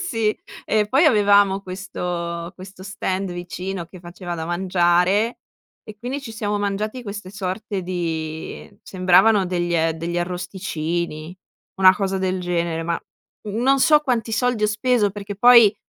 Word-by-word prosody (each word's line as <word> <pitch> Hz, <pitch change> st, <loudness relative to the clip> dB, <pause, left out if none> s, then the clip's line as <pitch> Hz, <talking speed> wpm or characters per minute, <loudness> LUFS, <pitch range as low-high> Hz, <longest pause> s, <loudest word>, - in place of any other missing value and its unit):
Sì. 225 Hz, -, 0 dB, 0.3 s
E 210 Hz, -1 st, +1 dB
poi 270 Hz, +8 st, +4 dB
avevamo 205 Hz, -6 st, +4 dB
questo 175 Hz, -2 st, -5 dB
questo 185 Hz, 0 st, -11 dB
stand 190 Hz, -1 st, -3 dB
vicino 175 Hz, 0 st, -5 dB
che 185 Hz, -, -13 dB
faceva 175 Hz, 0 st, -7 dB
da 160 Hz, -1 st, -4 dB
mangiare 180 Hz, +4 st, +2 dB, 0.5 s
e 215 Hz, -, -11 dB
quindi 250 Hz, +6 st, -4 dB
ci 245 Hz, -5 st, -8 dB
siamo 210 Hz, -1 st, -2 dB
mangiati 210 Hz, +4 st, -2 dB
queste 205 Hz, -3 st, -7 dB
sorte 200 Hz, 0 st, -4 dB
di 160 Hz, -3 st, -4 dB
sembravano 185 Hz, +2 st, +4 dB
degl 175 Hz, -2 st, 0 dB
degli 170 Hz, +2 st, -3 dB
arrosticini, 175 Hz, -2 st, -4 dB, 0.4 s
una 190 Hz, -1 st, +7 dB
cosa 195 Hz, -1 st, -1 dB
del 185 Hz, 0 st, -1 dB
genere. 170 Hz, -2 st, -1 dB
Ma, 170 Hz, 0 st, -2 dB, 0.5 s
mhmm, 220 Hz, +4 st, -2 dB
non 275 Hz, +1 st, +4 dB
so 300 Hz, +2 st, +6 dB
quanti 240 Hz, -6 st, -1 dB
soldi 245 Hz, -1 st, +1 dB
ho -, -, +4 dB
speso, 210 Hz, 0 st, +1 dB
perché 205 Hz, 0 st, -7 dB
poi 235 Hz, -2 st, +7 dB
190 Hz, 145 wpm, -22 LUFS, 175-215 Hz, 0.5 s, una